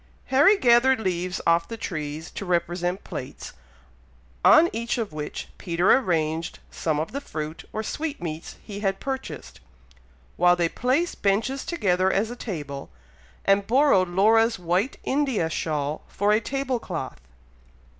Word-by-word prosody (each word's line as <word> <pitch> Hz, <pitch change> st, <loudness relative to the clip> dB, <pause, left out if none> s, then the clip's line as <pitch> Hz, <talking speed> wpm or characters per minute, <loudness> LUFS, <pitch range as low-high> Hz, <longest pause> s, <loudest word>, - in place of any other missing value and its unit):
Harry 300 Hz, +10 st, +6 dB
gathered 250 Hz, -2 st, +5 dB
leaves 180 Hz, -2 st, -2 dB
off 170 Hz, 0 st, +3 dB
the 230 Hz, -, -6 dB
trees 155 Hz, -6 st, -5 dB
to -, -, -6 dB
represent 175 Hz, +1 st, -1 dB
plates, -, -, -7 dB, 0.9 s
on 320 Hz, +2 st, +7 dB
each 230 Hz, +2 st, -2 dB
of 220 Hz, -8 st, -3 dB
which 150 Hz, -1 st, -5 dB
Peter 175 Hz, 0 st, +3 dB
arranged 165 Hz, -7 st, -1 dB
some 155 Hz, -2 st, -1 dB
of 155 Hz, -, -3 dB
the 280 Hz, -, -4 dB
fruit 155 Hz, -, -6 dB
or 220 Hz, -, -3 dB
sweetmeats 185 Hz, -, -5 dB
he 205 Hz, -2 st, -7 dB
had 195 Hz, -2 st, -1 dB
purchased, 265 Hz, -, -6 dB, 0.8 s
while 175 Hz, 0 st, +5 dB
they 175 Hz, -1 st, +1 dB
placed 260 Hz, -, -1 dB
benches 220 Hz, +7 st, +1 dB
together 190 Hz, -, +1 dB
as 215 Hz, +4 st, 0 dB
a -, -, -6 dB
table, 145 Hz, -, -6 dB, 0.6 s
and 195 Hz, 0 st, +3 dB
borrowed 250 Hz, -7 st, +4 dB
Laura's 225 Hz, +5 st, +4 dB
white 180 Hz, -, 0 dB
India 260 Hz, -, 0 dB
shawl 150 Hz, -1 st, -2 dB
for 205 Hz, +1 st, 0 dB
a 215 Hz, +1 st, +3 dB
table 265 Hz, +1 st, -2 dB
cloth. 155 Hz, -, -6 dB
195 Hz, 140 wpm, -25 LUFS, 170-240 Hz, 0.9 s, on